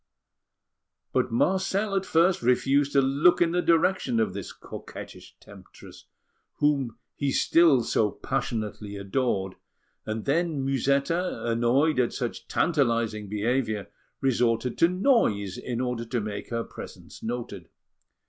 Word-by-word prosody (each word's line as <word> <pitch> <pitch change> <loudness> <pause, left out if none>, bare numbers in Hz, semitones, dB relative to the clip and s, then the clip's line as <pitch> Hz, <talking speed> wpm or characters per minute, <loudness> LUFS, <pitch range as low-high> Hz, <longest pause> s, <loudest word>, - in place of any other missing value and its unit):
But - - +1
Marcel 190 - +1
at 195 0 -1
first 170 +3 +3
refused 135 +4 +2
to 140 - +5
look 140 +6 +4
in 170 -1 +3
the 180 +1 +1
direction 165 -7 +2
of 110 - 0
this 100 -1 -6
coquettish - - -10
temptress, - - -15 0.5
whom 140 -6 0 0.2
he 140 -1 -1
still 155 -4 +4
so 110 -1 +1
passionately 110 -5 -4
adored; 100 -2 -2 0.5
and 110 0 -4
then, 155 -1 0
Musetta, 140 +6 0
annoyed 120 +6 +2
at 120 - +1
such 120 -2 -4
tantalising 115 - 0
behaviour, 110 0 -1 0.3
resorted 120 -2 +1
to 165 - +6
noise 180 - +1
in 120 -2 -4
order 125 -2 -2
to 120 +1 -2
make 105 -1 -5
her 115 -1 -2
presence - - -11
noted. 110 -7 -5
125 Hz, 125 wpm, -26 LUFS, 115-155 Hz, 0.5 s, to